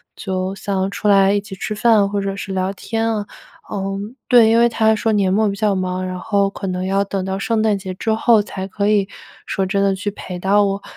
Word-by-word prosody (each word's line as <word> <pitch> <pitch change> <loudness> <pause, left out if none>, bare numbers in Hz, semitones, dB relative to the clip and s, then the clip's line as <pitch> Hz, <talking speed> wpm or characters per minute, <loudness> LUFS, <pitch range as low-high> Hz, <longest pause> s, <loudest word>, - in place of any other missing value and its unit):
就 185 -1 -3
想 195 0 -2
出 210 - -3
来 195 -1 +5
一 205 - +1
起 200 -1 -9
吃 215 - -4
饭 215 -2 +4
或 200 0 -1
者 195 0 -3
是 195 -1 -6
聊 185 0 -1
天 225 +3 -2
啊。 205 -1 -3 0.4
呃， 195 0 -3 0.3
对 235 -3 +6
因 230 +1 +4
为 235 - +5
他 220 -1 +2
说 220 0 0
年 195 -3 +2
末 215 +2 +2
比 200 - -3
较 210 0 +1
忙， 185 -1 -2
然 185 0 -5
后 200 0 +1
可 195 0 -6
能 180 0 -2
要 195 +1 +1
等 195 -1 -3
到 190 +1 -3
圣 225 +2 0
诞 215 -2 +2
节 190 -1 -6
之 220 +4 -2
后 225 -1 +4
才 190 -2 -6
可 200 +1 -1
以 205 -2 +2 0.4
说 195 - -1
真 195 +1 0
的 195 -1 +2
去 200 +2 -3
陪 185 -2 -7
到 200 +3 +3
我。 195 0 -2
200 Hz, 255 characters per minute, -19 LUFS, 190-215 Hz, 0.4 s, 对